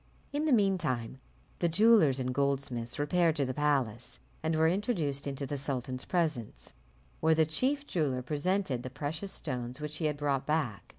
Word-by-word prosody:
In 295 +2 0
the 310 - +2
mean 200 -6 +4
time, 120 -4 -2 0.4
the 170 - +2
jewellers 175 - +5
and 125 0 -1
goldsmiths 135 -3 -1
repaired 160 +2 +2
to 140 -3 +1
the 130 - -2
palace, 130 -5 0 0.2
and 160 0 0
were 160 +1 +4
introduced 165 - 0
into 140 0 -3
the 140 +1 -3
sultan's 130 -2 -3
presence; 150 - -2 0.5
where 160 0 +4
the 160 0 +4
chief 265 - 0
jeweller 140 - -1
presented 150 -1 0
the 130 - -6
precious 155 +8 -4
stones 125 -3 -4
which 150 0 -4
he 160 - -2
had 150 -1 0
brought 140 -2 -1
back. 150 - -1
145 Hz, 175 wpm, -31 LUFS, 130-165 Hz, 0.5 s, jewellers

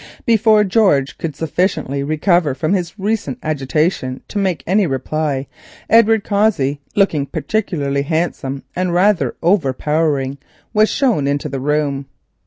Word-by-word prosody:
Before 220 -2 +4
George 190 -10 +2
could 155 -4 -4
sufficiently 160 -4 -1
recover 155 0 +1
from 155 +7 -1
his 180 0 -2
recent 215 +4 -2
agitation 150 -2 -1
to 205 - -3
make 180 -8 -1
any 195 +1 +2
reply, 140 +1 -2 0.5
Edward 225 -1 +5
Cossey, 195 -10 +1
looking 160 -8 +2
particularly 145 -4 -1
handsome 140 -3 -2
and 180 -1 -1
rather 190 0 +2
overpowering, 150 -4 +1 0.3
was 215 0 +4
shown 230 - +1
into 145 +1 -1
the 135 -1 -4
room. 140 -1 -1
160 Hz, 125 wpm, -18 LUFS, 140-200 Hz, 0.5 s, Edward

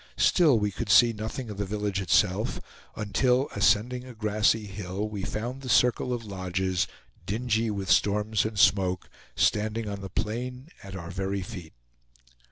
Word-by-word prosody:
Still, 155 -9 +4
we 105 -1 0
could 110 +2 -5
see 115 +3 +6
nothing 110 +2 -5
of 100 - -8
the - - 0
village 105 -1 -2
itself 95 +4 +1 0.4
until, 125 +6 +1
ascending 110 +5 +2
a 125 -2 -11
grassy 110 0 +1
hill, 100 0 -4
we 105 -2 -5
found 120 +7 -4
the 130 - -7
circle 125 +1 +3
of 120 -2 -3
lodges, 95 -2 -1 0.4
dingy 115 +1 0
with 100 -2 -3
storms 105 0 +2
and 110 -1 -4
smoke, 95 -3 +2 0.2
standing 110 +1 +1
on 100 -1 -5
the 95 - -6
plain 125 - -4
at 95 -1 -8
our 85 -2 -7
very 95 +1 -2
feet. 90 -6 -9
105 Hz, 160 wpm, -27 LUFS, 95-115 Hz, 0.4 s, see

